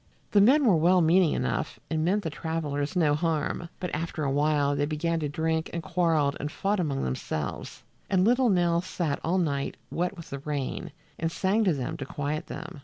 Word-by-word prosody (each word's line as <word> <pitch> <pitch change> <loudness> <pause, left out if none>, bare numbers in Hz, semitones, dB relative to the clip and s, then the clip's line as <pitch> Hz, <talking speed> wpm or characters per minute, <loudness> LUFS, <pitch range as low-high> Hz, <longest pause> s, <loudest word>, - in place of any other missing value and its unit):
The 205 - +5
men 270 +7 +5
were 205 -7 +5
well 175 +4 +4
meaning 170 0 +4
enough - - -2
and 155 -1 -1
meant 200 +5 +1
the 160 - -3
travelers 150 0 -3
no 155 -5 +3
harm, 165 +1 -1
but 180 - -4
after 160 0 -3
a 140 - 0
while 145 0 +2
they 145 +1 0
began 165 +2 -1
to 150 -2 -2
drink 160 +2 -1
and 170 -1 -4
quarreled 165 -6 +1
and 150 - -3
fought 200 +5 0
among 145 -6 -1
themselves, 70 +3 -4 0.3
and 185 -1 +3
little 245 +2 +4
Nell 175 -3 +3
sat 170 -5 -2
all 175 +3 +1
night, 140 -6 -1
wet 180 +3 -1
with 170 - -10
the 140 - -4
rain, 145 +3 -4 0.3
and 165 0 -1
sang 200 +6 +1
to 185 - +4
them 130 -3 -3
to 135 - -5
quiet 145 +2 -3
them. - - -7
160 Hz, 200 wpm, -27 LUFS, 145-180 Hz, 0.3 s, The